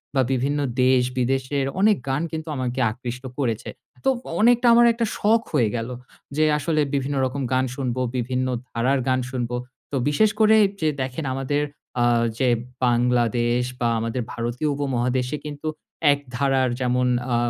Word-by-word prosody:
বা 135 - +4
বিভিন্ন 135 +3 0 0.2
দেশ-বিদেশের 130 +2 +1
অনেক 210 0 +4
গান 135 +3 0
কিন্তু 160 0 -5
আমাকে 130 -1 -2
আকৃষ্ট 125 +2 -6
করেছে। 120 -6 -2 0.4
তো - - +5 0.3
অনেকটা 240 +2 +5
আমার 240 0 +7
একটা 230 0 -1
শখ 220 +2 +3
হয়ে 120 -8 +3
গেলো 115 +2 -3 0.4
যে, 155 - +4
আসলে 155 +1 0
বিভিন্ন 140 +1 -1
রকম 135 +2 -3
গান 130 0 +2
শুনব, 130 -3 -2 0.2
বিভিন্ন 130 +1 -1 0.2
ধারার 130 +4 +1
গান 130 0 +2
শুনব। 125 -2 -3 0.4
তো - - -2
বিশেষ 215 +9 +3
করে 220 0 +6 0.3
যে 155 - +3
দেখেন 130 +4 -3
আমাদের 145 +2 0 0.4
আ - - +4 0.3
যে 130 - +2 0.4
বাংলাদেশ 120 0 +2 0.2
বা 120 - +1
আমাদের 115 +3 -2
ভারতীয় 120 +5 -2
উপমহাদেশে 130 -1 -1
কিন্তু 150 +1 -6 0.4
এক 140 - +1 0.2
ধারার 135 -1 +2
যেমন 125 0 +1 0.3
আ - - +3
130 Hz, 150 wpm, -23 LUFS, 125-145 Hz, 0.4 s, আমার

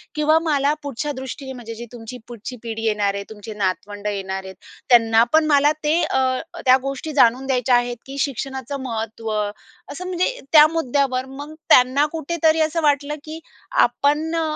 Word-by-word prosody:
किंवा 305 +1 +3
मला 290 -2 +2
पुढच्या 285 +1 -3
दृष्टीने 265 0 -7
म्हणजे 230 -2 -8
जी 235 +2 -8
तुमची 240 +1 -8
पुढची 240 +1 -8
पिढी 225 -1 -5
येणार 210 -2 +1
आहे, 200 0 -4
तुमचे 215 0 -9
नातवंड 205 +1 -3
येणार 190 -2 -3
आहेत 190 0 -9 0.3
त्यांना 230 -2 +5
पण 315 0 +5
मला 290 0 +4
ते 310 +3 +2
अ, 265 - 0 0.5
त्या 255 0 +7
गोष्टी 275 +3 -4
जाणून 255 -1 +4
द्यायच्या 250 -1 +2
आहेत, 245 0 0
की 270 +1 -8
शिक्षणाचं 265 0 -3
महत्त्व." 225 -2 -4 0.6
असं 365 +6 -7
म्हणजे 370 +7 -1
त्या 305 0 +9
मुद्द्यावर 275 -4 0
मग 285 +3 -9 0.2
त्यांना 255 +4 +5
कुठेतरी 320 0 +1
असं 330 +1 -2
वाटलं, 285 -1 +2 0.2
की 315 +1 -8 0.4
"आपण 305 +3 +1
अ, 330 - +1
265 Hz, 165 wpm, -21 LUFS, 230-295 Hz, 0.6 s, त्या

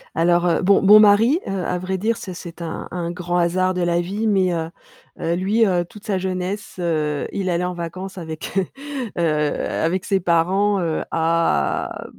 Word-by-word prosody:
Alors, 175 +1 +3
heu, 170 - +2
bon, 195 +2 +4
mon 210 +2 +8
mari, 220 +9 +5
heu, - - -3
à 180 - -1
vrai 185 +1 -3
dire, 225 +4 0
c'est 185 - -7
c'est 175 -1 -10
un 165 -1 -5
un 175 -1 -3
grand 175 0 -2
hasard 185 +2 +1
de 180 - -2
la 175 0 +1
vie 200 +5 -2
mais, 190 -4 +2
heu, 165 -1 -2 0.5
heu, 170 +1 0
lui, 205 +5 +2
heu, 180 -3 +1
toute 210 +4 -15
sa 200 -3 0
jeunesse, 185 +2 -4
heu, 155 -4 -1
il 190 -2 -2
allait 175 0 0
en 180 - -2
vacances 185 +3 -6
avec, 160 -2 -6
heu, 190 - +2 0.5
heu, - - +2
avec 160 +3 0
ses 195 -2 +1
parents, 190 +4 +2
heu, 165 -2 -1
à,, 165 - 0
180 Hz, 190 wpm, -21 LUFS, 170-195 Hz, 0.5 s, mon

